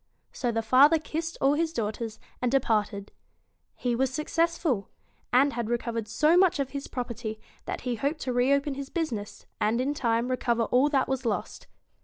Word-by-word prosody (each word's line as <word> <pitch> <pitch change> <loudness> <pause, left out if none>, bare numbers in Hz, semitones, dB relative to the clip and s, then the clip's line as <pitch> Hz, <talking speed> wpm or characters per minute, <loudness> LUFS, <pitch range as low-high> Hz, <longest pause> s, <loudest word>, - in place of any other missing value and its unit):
So 245 -2 -1
the 225 0 -1
father 275 +8 +6
kissed 320 +2 -4
all 275 +1 +4
his 320 +2 0
daughters, 220 -2 -3 0.2
and 250 -1 +1
de 270 - +5
parted. 210 -4 -1 0.6
He 245 -1 -1
was 265 +2 +1
successful; 305 - 0 0.4
and 275 +3 +4
had 235 -2 -3
recovered 230 -2 -2
so 300 +10 +3
much 365 -2 +4
of 270 -1 -1
his 280 -1 -5
property 235 -3 -5 0.3
that - - -4
he 250 -1 -2
hoped 285 +7 -2
to 255 - -2
reopen 275 +3 +2
his 275 0 -6
business, 240 - -4
and 220 +3 +1
in 270 +3 0
time 235 -3 0
recover 235 -2 +1
all 255 +5 +3
that 275 -3 +2
was 265 -1 -2
lost. 225 -4 -3
255 Hz, 180 wpm, -27 LUFS, 230-285 Hz, 0.6 s, father